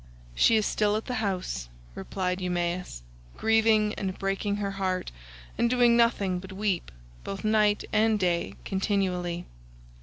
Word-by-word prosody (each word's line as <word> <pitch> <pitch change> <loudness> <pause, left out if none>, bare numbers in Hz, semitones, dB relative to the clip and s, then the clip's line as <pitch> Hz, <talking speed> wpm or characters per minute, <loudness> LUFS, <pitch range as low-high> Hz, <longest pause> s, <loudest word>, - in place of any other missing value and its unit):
"She 225 - +4
is 215 -1 +2
still 210 -1 +1
at 215 - -2
the 250 - -4
house," 180 - -3 0.2
replied 180 - -3
Eumaeus, 175 - -2 0.3
"grieving 220 -1 +3
and 190 -2 -3
breaking 195 +1 -1
her 200 -1 -2
heart, 190 -2 -2 0.5
and 235 - +3
doing 245 -1 +4
nothing 205 -6 +2
but 190 +1 -10
weep, 195 - -1 0.3
both 195 +2 -6
night 215 -1 +3
and 220 0 +3
day 175 -2 0
continually." 185 -3 -1
195 Hz, 140 wpm, -27 LUFS, 180-215 Hz, 0.5 s, She